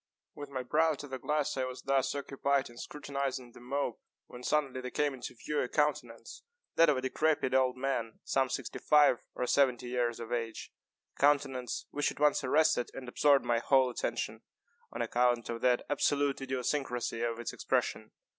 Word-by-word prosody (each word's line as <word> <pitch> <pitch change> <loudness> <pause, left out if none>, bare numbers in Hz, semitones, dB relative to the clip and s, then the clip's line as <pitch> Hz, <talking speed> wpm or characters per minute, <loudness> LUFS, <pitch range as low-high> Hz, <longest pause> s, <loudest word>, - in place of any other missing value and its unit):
With 145 -1 -8
my 130 -2 -4
brow 155 +4 +2
to 145 - -8
the 130 -1 -6
glass, 150 +2 0
I 130 - 0
was 130 0 -7
thus 135 -1 +1
occupied 140 -2 -1
in 120 - -16
scrutinizing 140 -4 -4
the - - -14
mob, 125 -1 -2 0.3
when 125 - -11
suddenly 135 -2 0
there 125 - -5
came 145 +2 0
into 125 -1 -7
view 150 +5 -2
a 125 - -2
countenance 125 -7 -1 0.3
(that 165 -1 +6
of 145 - +3
a - - -1
decrepid 130 +1 +1
old 130 -1 +3
man, 130 -4 -2
some 135 -1 +1
sixty 135 -2 -4
five 150 -5 +5 0.2
or 125 - -1
seventy 125 -2 +2
years 120 -2 -1
of 115 - -7
age,) 115 -2 -4 0.4
a - - -23
countenance 135 -4 +1
which 145 - 0
at - - -9
once 150 -1 +3
arrested 155 -1 +3
and 130 -1 -7
absorbed 140 +2 +3
my 120 -1 +2
whole 130 +1 +3
attention, - - -3 0.5
on - - -2
account 120 -1 +1
of 115 0 -4
the 125 -1 +2
absolute 145 -1 +1
idiosyncrasy 130 -2 -2
of 115 -1 -1
its 120 - -4
expression. - - -1
130 Hz, 185 wpm, -31 LUFS, 125-145 Hz, 0.5 s, that